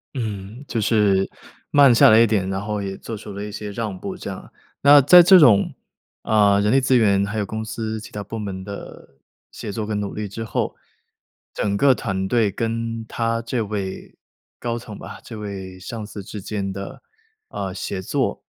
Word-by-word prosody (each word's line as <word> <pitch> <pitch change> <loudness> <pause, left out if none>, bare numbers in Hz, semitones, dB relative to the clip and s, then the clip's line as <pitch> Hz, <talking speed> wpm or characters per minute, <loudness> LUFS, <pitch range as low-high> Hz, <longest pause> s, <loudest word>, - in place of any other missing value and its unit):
嗯， 110 +1 -5
就 115 - -2
是 100 -3 +2 0.4
慢 140 -4 +6
下 - - +7
来 110 +1 +7
一 115 - +7
点， 100 -4 0
然 95 - -2
后 105 -1 -2
也 95 -1 -5
做 115 - -7
出 105 -1 -9
了 100 +1 -6
一 105 - -7
些 105 0 -6
让 105 -2 -4
步 - - -6
这 - - -7
样。 - - -9 0.3
那 145 +1 +8
在 175 +7 +9
这 185 +2 +8
种， 115 - +5 0.5
呃， 105 -2 +4
人 105 +3 +2
力 135 - +4
资 130 0 +3
源 100 -4 +3
还 105 +2 -4
有 105 - 0
公 110 +2 -5
司 110 0 -4
其 105 - -11
他 105 -1 -5
部 115 +3 -6
门 95 -3 -5
的 100 -8 -10 0.3
协 105 - -6
作 110 +1 -3
跟 105 -1 -2
努 100 -1 -4
力 105 0 -3
之 115 +3 -6
后， 110 - -2 0.8
整 100 -1 -1
个 135 +3 +5
团 95 -4 -3
队 110 -1 +2
跟 115 +2 -3
他 115 0 -1
这 115 0 -2
位 100 -3 -5 0.4
高 120 0 -3
层 110 -4 -10
吧， - - -9
这 115 - -9
位 95 -3 -7
上 110 +4 -6
司 100 -2 -8
之 105 +2 -8
间 100 -1 -4
的， 100 0 -8 0.5
呃， - - -4
协 - - -4
作 - - -1
105 Hz, 215 characters per minute, -22 LUFS, 100-115 Hz, 0.8 s, 在